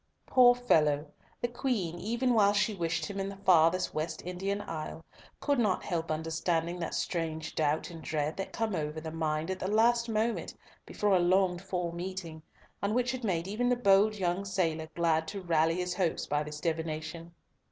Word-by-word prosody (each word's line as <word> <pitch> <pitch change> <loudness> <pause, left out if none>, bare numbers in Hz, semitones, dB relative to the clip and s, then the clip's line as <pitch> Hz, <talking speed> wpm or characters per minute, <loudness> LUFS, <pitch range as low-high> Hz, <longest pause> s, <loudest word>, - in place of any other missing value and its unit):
Poor 245 -1 +6
fellow! 155 -12 +2 0.4
the 240 - +1
Queen, 235 -9 -2
even 240 +5 0
while 205 -3 +5
she 210 +1 +2
wished 170 -3 -1
him 200 -1 -5
in 195 0 -2
the 200 - -7
farthest 185 -2 +3
West 155 +1 -3
Indian 190 +3 -2
isle, 160 -2 -6 0.3
could 285 -3 +1
not 210 -5 +1
help 165 -3 -2
understanding 165 +2 -1
that 170 - -3
strange 160 -2 -2
doubt 155 +2 0
and 165 -1 -9
dread 155 0 -2
that 195 - -5
come 225 -2 -2
over 155 -2 -2
the 160 0 -6
mind 160 +1 -1
at 190 - -4
the 185 - -2
last 235 +2 +3
moment 225 +1 -1 0.3
before 205 -2 +1
a - - +4
longed 180 0 +2
for 180 -3 -3
meeting, 170 -2 -6 0.4
and 200 +2 0
which 250 0 +1
had 255 -1 -5
made 175 -5 0
even 235 +5 0
the 250 - +3
bold 210 -2 +4
young 185 -1 -1
sailor 165 -5 -1
glad 160 -2 +1
to 200 +4 -5
rally 165 -2 +2
his 180 0 -2
hopes 180 -2 0
by 145 +1 0
this 150 0 -6
divination. 160 +1 -4
180 Hz, 185 wpm, -30 LUFS, 160-205 Hz, 0.4 s, Poor